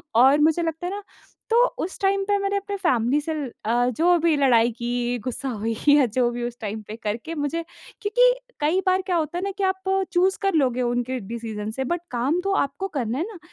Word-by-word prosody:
और 265 +5 +6
मुझे 320 +2 +3
लगता 325 +2 -3
है 370 - -3
ना 410 - -7 0.5
तो 460 - +3 0.3
उस 370 - -6
टाइम 390 0 +2
पे 405 0 +2
मैंने 395 0 0
अपने 400 0 -4
फैमिली 270 - +2
से 320 +2 -3
ल 290 -5 -4
अ, 240 +2 +2
जो 345 +8 +3
भी 330 -1 +3
लड़ाई 240 -4 +4
की, 240 +1 -2
गुस्सा 255 +4 -4
हुई 225 -1 -2
या 290 -2 +6
जो 240 +1 +1
भी 240 0 -4
उस 240 0 -4
टाइम 215 0 -4
पे 215 - -6
करके 230 +10 -3
मुझे 300 +3 -2 0.4
क्योंकि - - +4 0.3
कई 315 +6 +2
बार 370 +1 +3
क्या 365 - +1
होता 320 +1 -2
है 360 - -3
ना 395 - -1
कि 400 - -2
आप 380 0 -1 0.2
चूज़ 375 +2 +3
कर 390 -1 +1
लोगे 255 -5 +2
उनके 245 +1 -1
डिसीजन 220 -1 -5
से 265 +4 -3
बट 345 - +1
काम 255 +8 0
तो 395 0 0
आपको 280 +8 -4
करना 240 -1 -1
है 325 - -1
ना। 425 -5 -10
290 Hz, 225 wpm, -24 LUFS, 240-370 Hz, 0.5 s, और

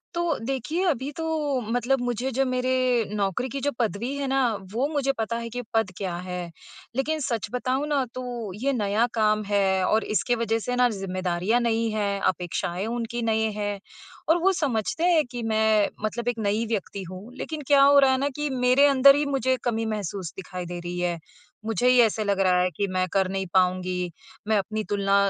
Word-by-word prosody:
तो 340 -3 0
देखिए, 270 +8 -2
अभी 275 -1 -2
तो 320 +3 -6 0.4
मतलब 245 +3 0
मुझे 245 +1 -1
जो 270 +3 +1
मेरे 255 0 0 0.4
नौकरी 205 +5 -1
की 275 - -1
जो 285 +1 0
पदवी 230 +3 -1
है 280 -1 -2
ना, 270 0 +2 0.3
वो 260 +5 +1
मुझे 285 -3 0
पता 230 +1 -2
है 230 0 -5
कि 245 - -2
पद 225 -4 +1
क्या 185 -4 -3
है। 180 -1 -5 0.4
लेकिन 310 +4 0
सच 235 -6 -2
बताऊँ 260 +3 -1
ना, 280 -3 +1
तो 240 -6 -5
ये 275 0 +2
नया 210 0 +1
काम 215 -1 +2
है 200 -1 +3 0.2
और 220 +1 +2
इसके 240 +6 +2
वज़ह 225 0 0
से 245 - 0
ना 245 0 +4
ज़िम्मेदारियाँ 185 +1 -1
नई 230 -1 +1
हैं 200 -1 0
अपेक्षाएँ 175 +2 -3
उनकी 235 0 -3
नए 220 0 +1
हैं, 205 -1 -2 0.5
और 330 - +6
वो 385 - +5
समझते 250 - -1
हैं 320 -3 +4
कि 240 -2 -5
मैं 215 -1 +3 0.2
मतलब 235 +2 -3
एक 245 -1 0
नई 215 +3 +1
व्यक्ति 200 -2 -3
हूँ, 195 +7 -10
लेकिन 310 -1 -5
क्या 285 -1 +6
हो 280 0 +7
रहा 270 -1 +5
है 260 - +2
ना 280 +2 0
कि 295 -1 -1
मेरे 255 +3 +5
अंदर 275 0 +7
ही 290 - +1
मुझे 260 0 +1
कमी 225 -2 0
महसूस 200 -5 -4
दिखाई 180 -1 -6
दे 175 0 -6
रही 175 +1 -5
है। 175 -1 -1 0.5
मुझे 225 +2 +1
ही 250 -1 +5
ऐसा 220 -1 +2
लग 200 -1 0
रहा 185 -2 +4
है 180 - +2
कि 200 - 0
मैं 185 0 0
कर 190 -1 +2
नहीं 190 0 -2
पाऊँगी। 180 -1 +1 0.4
मैं 215 -1 +3
अपनी 215 +2 -2
तुलना 200 -1 +1
225 Hz, 200 wpm, -25 LUFS, 200-260 Hz, 0.5 s, हो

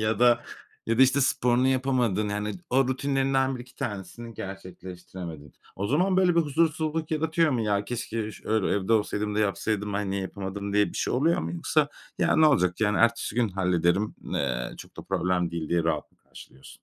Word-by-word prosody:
ya 110 +1 +1
da 120 -1 +4 0.4
ya 115 +1 0
da, - - +8
işte, 135 +2 +4
sporunu 125 0 +2
yapamadın, 125 -6 +1
yani, 105 +1 -2 0.2
o 130 0 +3
rutinlerinden 135 0 +1
1-2 125 +1 -11
tanesini 115 -1 -6
gerçekleştiremedin. 90 -5 -8 0.2
O 100 +2 -2
zaman 185 - +2
böyle 180 -2 +4
bir - - +6
huzursuzluk 160 +1 0
yaratıyor 160 +1 +2
mu? 120 - 0
"Ya, 105 -1 0
keşke, 115 -1 -3
iş - - -12
ö 110 -2 +1
evde 100 +2 0
olsaydım 105 -1 0
da - - 0
yapsaydım 105 0 -1
ben 100 -1 -2
niye 100 0 -1
yapamadım?" 100 +1 -5
diye 105 0 +3
bir - - -11
şey - - -1
oluyor 160 +7 +2
mu? 85 +1 -4
Yoksa, 85 - +1 0.3
"Ya, - - +2
ne 155 0 +6
olacak, 90 -9 +2
yani, 105 -3 +2
ertesi 115 -2 +2
gün 120 -3 +2
hallederim, 90 +1 +1 0.2
eee, 60 -3 -1
çok - - -12
da - - -7
problem 90 -1 0
değil" 85 -2 -4
diye 85 -1 +1
rahat 80 -3 -1
mı - - -34
karşılıyorsun 65 - -15
110 Hz, 190 wpm, -27 LUFS, 95-130 Hz, 0.4 s, da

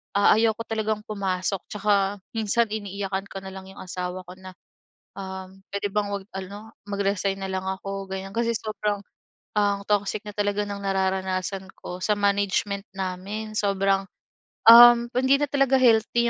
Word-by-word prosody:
ah, 200 +1 +6
ayoko 225 0 +2
talagang 220 -1 -1
pumasok. 195 -2 -2
Tsaka 205 -1 +1 0.2
minsan 225 +1 +1
iniiyakan 200 -2 -3
ko 195 - -5
na - - -8
lang 190 0 -9
'yong - - -14
asawa 180 0 -4
ko 180 - -9
na, 185 0 -10 0.7
um, 190 0 -8
puwede 200 0 -1
bang 210 -1 0
huwag 200 -1 -4
ano, 200 +3 -8 0.2
mag-resign 200 -1 0
na 195 0 -4
lang 190 0 -2
ako 195 0 -4
ganyan. 190 0 -5
Kasi 235 0 +1
sobrang 210 -1 -2 0.6
ang 205 -1 +2
toxic 205 0 +1
na 210 - -6
talaga 205 0 0
ng 200 0 -5
nararanasan 190 0 -1
ko 180 +1 -7
sa 210 - +3
management 200 0 0
namin, 195 +3 -4
sobrang 195 -1 +2 0.7
um, 240 0 +10
hindi 260 +2 +4
na 290 - +2
talaga 275 -1 +3
healthy 235 0 +4
200 Hz, 155 wpm, -25 LUFS, 190-215 Hz, 0.7 s, um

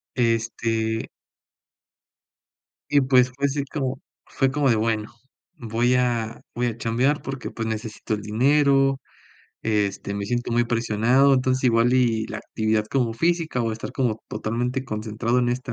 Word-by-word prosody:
Este 115 -1 0 1.8
y 145 -1 +4
pues 130 -1 +4
fue 140 +2 -1
así 140 +1 -2
como 135 -2 -3 0.3
fue 135 -1 0
como 145 -1 +1
de: 115 - +4
"Bueno, 110 0 -1 0.5
voy 120 +2 +1
a 120 -3 0
voy 120 +1 0
a 115 - -3
chambear 125 +6 +1
porque, 135 -2 -5
pues, 115 -1 -4
necesito 110 0 -4
el 105 - -2
dinero, 135 +4 +3 0.6
este, 100 -2 -1
me 100 0 -3
siento 120 +1 -2
muy 120 +1 +3
presionado, 120 +4 +3
entonces 130 0 +1
igual 120 0 +4
y 115 -4 +2
la - - -5
actividad 110 -1 -1
como 120 -2 0
física 165 -1 0
o 115 - -1
estar 110 - -6
como 120 -5 -1
totalmente 120 +5 -2
concentrado 110 +2 -1
en 120 -1 +1
esta 125 0 -3
120 Hz, 150 wpm, -24 LUFS, 110-130 Hz, 1.8 s, y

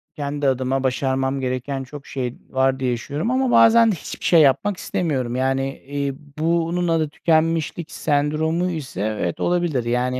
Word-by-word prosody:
Kendi 145 -1 -2
adıma 130 +1 0
başarmam 130 +1 0
gereken 130 +1 -3
çok 140 +2 -11
şey 125 -3 -4
var 130 0 +1
diye 125 -2 0
düşünüyorum 145 - -3
ama 260 -1 +1
bazen 230 0 +6
de - - -1
hiçbir 155 - -8
şey 165 -3 +6
yapmak 145 +8 +3
istemiyorum. 130 -11 -2
Yani, 135 +1 0
eee, 140 0 -3 0.2
bunun 170 +2 0
adı 160 -2 +1
tükenmişlik 165 +1 0
sendromu 155 +4 0
ise 145 - -5
evet 105 -5 -2
olabilir. 175 -7 0
Yani 125 +2 0
140 Hz, 155 wpm, -22 LUFS, 130-165 Hz, 0.2 s, bazen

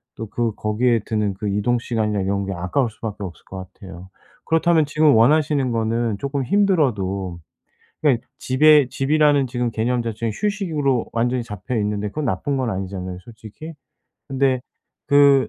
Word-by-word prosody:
또 110 - -6
그 115 -1 -1
거기에 115 +3 +1
드는 105 -3 -1
그 105 +2 -4
이동 105 +5 +1
시간이나 110 -4 -1
이런 100 +1 -1
게 95 - -3
아까울 90 +8 0
수밖에 110 -1 -7
없을 90 -3 -8
것 95 -1 -9
같아요. 95 -1 -11 0.4
그렇다면 165 -1 +3
지금 150 0 +3
원하시는 140 +2 +3
거는 115 -1 0
쪼끔 140 +3 -2
힘들어도 115 - +1 0.6
그러니까 135 -6 +2
집에 145 +1 +5
집이라는 145 0 +2
지금 120 -1 -2
개념 120 +3 0
자체는 115 0 -3
휴식으로 160 - -1
완전히 120 +1 0
잡혀 115 +2 -5
있는데 105 -1 -1
그건 150 +7 -4
나쁜 120 +6 -1
건 130 -3 -1
아니잖아요 95 -1 -5
솔직히. 115 - -11 0.6
근데 135 -1 +1 0.5
그 140 -1 +5
120 Hz, 355 characters per minute, -21 LUFS, 105-140 Hz, 0.6 s, 집에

